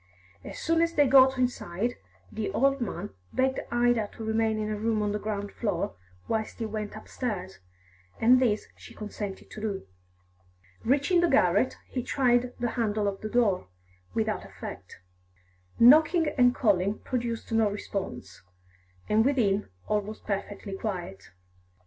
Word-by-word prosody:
As - - -8
soon 330 0 +1
as 335 0 +1
they 290 - +5
got 265 0 +6
inside, 245 -3 -1 0.4
the 215 -2 -3
old 275 +3 +2
man 200 -3 -4 0.2
begged 265 +1 +1
Ida 240 -3 +2
to 225 - -8
remain 220 0 +1
in 215 0 -2
a - - -1
room 215 0 0
on 205 - 0
the 210 - -2
ground 205 -1 -4
floor 200 - -2 0.3
whilst 220 -1 -2
he 230 - -3
went 215 -1 -4
upstairs, 210 -4 -5 0.6
and 250 +3 +6
this 220 -5 +1
she - - -14
consented 210 -2 -6
to 215 - -8
do. 200 - -3 1.0
Reaching 285 +8 +3
the 345 - +4
garret, - - +3
he 255 - -3
tried 245 -1 +2
the 240 -1 -1
handle 215 -3 0
of 195 -1 -3
the 215 - -4
door, 215 - +2 0.5
without - - 0
effect. - - -9 0.8
Knocking 310 +6 +6
and 245 -1 +4
calling 200 -3 +2
produced 235 -2 -3
no 225 -2 +3
response, 185 - -5 0.7
and 215 +1 +4
within 220 -7 +1 0.2
all 210 0 +1
was 215 +2 -8
perfectly 200 0 -4
quiet. 180 - -5
220 Hz, 150 wpm, -28 LUFS, 205-250 Hz, 1.0 s, got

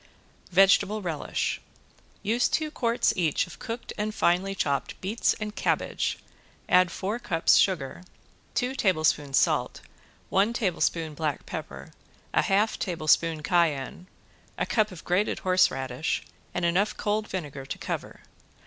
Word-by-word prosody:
~VEGETABLE 195 +3 +4
RELISH~ 165 -4 -2 0.6
Use 230 +4 +2
two 310 -1 0
quarts 235 -4 +1
each 165 -5 +1
of 175 - -13
cooked 230 +1 -6
and 215 +1 -2
finely 185 +3 +2
chopped 140 -6 -1
beets 205 +5 0
and 210 -1 -5
cabbage, - - 0 0.5
add 180 0 +5
four 205 +7 -3
cups 165 -8 +3
sugar, 170 -6 +1 0.5
two 250 +1 0
tablespoons 155 - +1
salt, - - +1 0.5
one 200 +4 +3
tablespoon 170 -7 0
black 150 -1 -3
pepper, - - -7 0.4
a - - +4
half 205 +3 +1
tablespoon 165 -2 +1
cayenne, 170 -1 0 0.5
a - - 0
cup 215 -2 +1
of 180 - -10
grated 185 +4 +1
horseradish 160 -7 +1 0.3
and 175 - -1
enough 185 +5 +1
cold 215 +1 -1
vinegar 145 -7 -5
to - - -4
cover. - - -5
185 Hz, 130 wpm, -27 LUFS, 160-210 Hz, 0.6 s, add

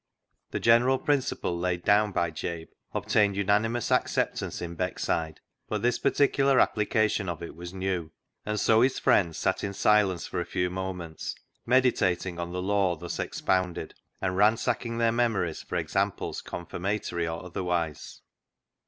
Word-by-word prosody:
The - - -3
general 120 +3 +4
principle 135 -11 0
laid 85 0 -2
down 105 +1 +4
by 85 -3 0
Jabe 80 +1 -5 0.2
obtained 100 -2 +2
unanimous 105 +4 +1
acceptance - - 0
in 85 0 -5
Beckside, 80 -3 -2 0.3
but - - -3
this 120 0 +2
particular 140 -1 +3
application 105 -2 +2
of 85 0 -5
it 85 - -8
was 85 +1 -8
new, 95 -4 -3 0.3
and 105 0 -2
so 110 +2 +4
his 130 +1 +3
friends 85 -5 +2
sat - - 0
in 100 0 -3
silence 100 -4 +3
for - - -3
a - - -1
few 90 +1 -1
moments 90 -3 -5 0.3
meditating 95 -9 +2
on 85 0 -4
the 90 0 -3
law 95 -2 +2
thus 80 - -6
ex - - -4
pounded, 95 -2 0 0.3
and 95 -1 -1
ransacking 115 +3 +2
their 115 -1 +3
memories 110 -9 0
for - - -7
examples - - -1
confirmatory 85 -1 -3
or 80 +2 -5
otherwise. 85 -4 -3
95 Hz, 150 wpm, -27 LUFS, 85-110 Hz, 0.3 s, general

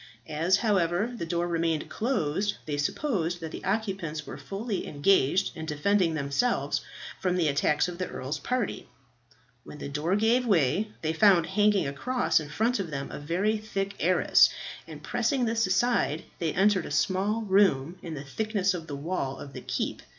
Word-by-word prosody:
As, 165 +5 +2
however, 200 0 +1
the 170 -8 -5
door 170 +1 0
remained 165 -2 0
closed, 205 - -1
they 145 -2 -3
supposed 175 - -1
that 160 -2 -6
the - - -8
occupants 190 -8 -2
were - - -7
fully 205 +1 -4
engaged 180 +3 +2
in 160 -1 -6
defending 165 +3 +1
themselves 140 - 0 0.4
from 180 -1 0
the 175 -3 +2
attacks 150 +2 +2
of 175 0 -7
the 185 - -2
earl's 135 +3 -4
party. 250 - -2 0.8
When - - -10
the 145 - -6
door 150 +6 0
gave 225 +4 +3
way, 200 - +2
they 160 0 0
found 180 -1 +5
hanging 205 +1 +2
across 170 - +1
in 150 -2 -7
front 225 +9 0
of 185 -4 -3
them 140 -2 -5
a - - -6
very 185 +9 0
thick 200 -2 -3
arras, 180 +2 +5 0.4
and - - -10
pressing 270 -5 0
this 225 -2 +1
aside 185 - +1 0.2
they 165 -2 0
entered 195 0 +2
a - - -8
small 205 +4 +1
room 185 -5 +2
in 165 -2 -6
the 140 - -6
thickness 200 +5 0
of 165 -3 -6
the 145 - -5
wall 140 -3 -3
of 140 - -9
the - - -7
keep. - - -3
180 Hz, 175 wpm, -28 LUFS, 155-210 Hz, 0.8 s, found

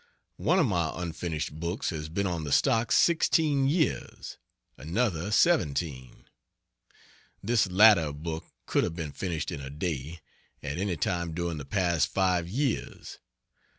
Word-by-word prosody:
One 175 +4 +2
of 175 - +4
my 85 -8 0
unfinished 80 -3 -4
books 85 +4 -2
has 75 -2 -5
been 100 +5 -1
on 85 -4 -2
the 75 - -5
stocks 115 - +3
sixteen 155 -4 +3
years; 155 +1 -2 0.4
another 85 - -1
seventeen. 75 - +1 1.2
This 115 0 +2
latter 95 -5 +6
book 80 +2 -5 0.2
could - - +1
have 80 - -3
been 80 -4 -5
finished 85 -1 -3
in 70 - -5
a 70 - -7
day, 80 +1 -4 0.4
at 75 +3 -4
any 95 -3 -1
time 85 0 -2
during 85 -2 -3
the 70 - -7
past 85 -3 +1
five 90 -3 0
years. 130 +4 -3
85 Hz, 140 wpm, -28 LUFS, 80-105 Hz, 1.2 s, latter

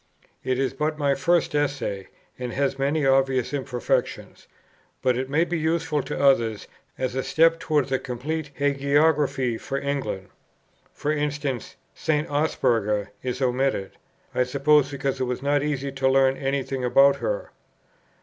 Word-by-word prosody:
It 130 -1 0
is 135 0 0
but 150 +3 -2
a 140 -1 +2
first 170 -1 +1
Essay, 135 -10 -1 0.3
and 125 -1 -4
has 140 -1 -1
many 145 +2 +1
obvious 135 -1 +2
imperfections; 130 -4 -2 0.6
but 125 -1 +3
it 130 +2 -3
may 155 +4 +3
be 175 -1 -2
useful 160 -1 0
to 135 - -5
others 115 -6 +2 0.3
as 130 -2 -2
a 130 - -1
step 165 +4 +3
towards 150 -5 0
a 130 - +1
complete 145 +5 -4
hagiography 140 -3 +2
for 135 - -3
England. 140 -9 -3 0.6
For 150 - -2
instance 145 -4 -2 0.2
St. 155 -3 -1
Osberga 115 -8 +1
is 130 +1 -3
omitted; 125 -5 0 0.4
I - - +1
suppose 140 +3 +3
because 140 -1 -3
it 130 - 0
was 125 +1 -4
not 145 0 +2
easy 140 -2 -2
to 135 0 +1
learn 135 0 +4
any 135 0 -1
thing 130 0 -4
about 135 +3 +5
her. - - -3
135 Hz, 150 wpm, -24 LUFS, 130-150 Hz, 0.6 s, about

